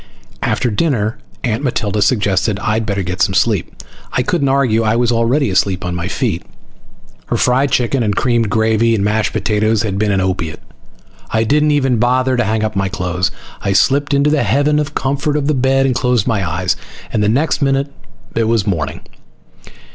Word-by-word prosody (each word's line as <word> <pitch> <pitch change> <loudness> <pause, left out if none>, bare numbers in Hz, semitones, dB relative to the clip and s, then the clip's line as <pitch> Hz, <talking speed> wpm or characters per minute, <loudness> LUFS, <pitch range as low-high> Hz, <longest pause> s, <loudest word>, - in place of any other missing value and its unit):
After 120 - 0
dinner 110 -3 0 0.2
Aunt 120 +2 -1
Matilda 105 -5 -1
suggested 100 -2 +1
I'd 110 +2 -1
better 100 -2 -1
get 90 0 -4
some 95 - +2
sleep. 105 -4 0 0.3
I 125 - +1
couldn't 140 -1 0
argue. 130 -5 +2
I 110 0 +1
was 120 0 +2
already 120 +2 +1
asleep 95 -1 0
on 90 - -2
my 85 0 -3
feet. 100 - -2 0.9
Her - - -1
fried 130 +3 +2
chicken 125 +1 +1
and 105 -3 0
creamed 120 -2 +1
gravy 110 +2 +2
and 100 - -1
mashed 105 +1 0
potatoes 110 0 0
had 100 -3 -2
been 105 -1 +1
an 95 - +1
opiate. 90 -4 -2 0.7
I 110 0 +1
didn't 150 +6 +2
even 135 -4 +2
bother 130 +2 +2
to 120 - +1
hang 110 0 0
up 110 -1 -2
my 95 -1 0
clothes. 90 -2 -1 0.3
I 100 - 0
slipped 140 +6 +2
into 140 +1 +2
the 150 -2 +2
heaven 145 +2 +2
of 150 0 -3
comfort 140 +2 -1
of 145 - -1
the 150 - +1
bed 135 0 +2
and 130 - +2
closed 125 -3 +1
my 100 -8 0
eyes. 90 +3 0 0.4
And 105 - +1
the 105 - +2
next 145 +6 +1
minute 140 0 0 0.4
it 115 - +1
was 110 -2 +1
morning. 80 -8 -2
115 Hz, 190 wpm, -16 LUFS, 100-135 Hz, 0.9 s, some